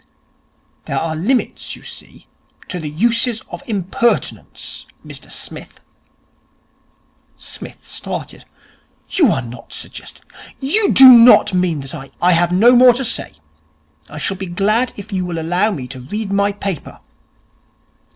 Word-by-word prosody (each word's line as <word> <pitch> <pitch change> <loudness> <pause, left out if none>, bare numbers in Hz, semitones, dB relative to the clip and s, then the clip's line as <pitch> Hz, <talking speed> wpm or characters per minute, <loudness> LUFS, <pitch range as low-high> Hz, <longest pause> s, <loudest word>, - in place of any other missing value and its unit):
'There - - -3
are 160 -1 -2
limits 225 +11 -2
you - - -16
see, - - -10 0.4
to 180 - -5
the 155 -2 -5
uses 230 - +1
of - - -7
impertinence, 210 +2 -2 0.2
Mr - - -8
Smith.' - - -6 1.6
Psmith - - -7
started. - - -5 0.6
'You 335 -7 +3
are 135 - -1
not 120 0 -11
suggesting! - - -9 0.3
You 395 +11 +1
do 265 - +9
not 240 -4 +8
mean 180 -5 0
that 135 0 -7
I 135 -4 -8
!' - - -36
'I 180 - +3
have 175 0 +3
no 230 +7 +5
more 250 0 +7
to 260 +2 -2
say. - - 0 0.8
I 150 - -9
shall 190 +5 -2
be 190 0 -6
glad 210 +8 +1
if 205 -1 -9
you 185 -1 -1
will 175 -2 -4
allow 175 +6 +1
me 145 -12 -5
to 130 -1 -8
read 200 - -4
my 200 +1 +2
paper.' 200 -4 -5
195 Hz, 145 wpm, -17 LUFS, 165-235 Hz, 1.6 s, do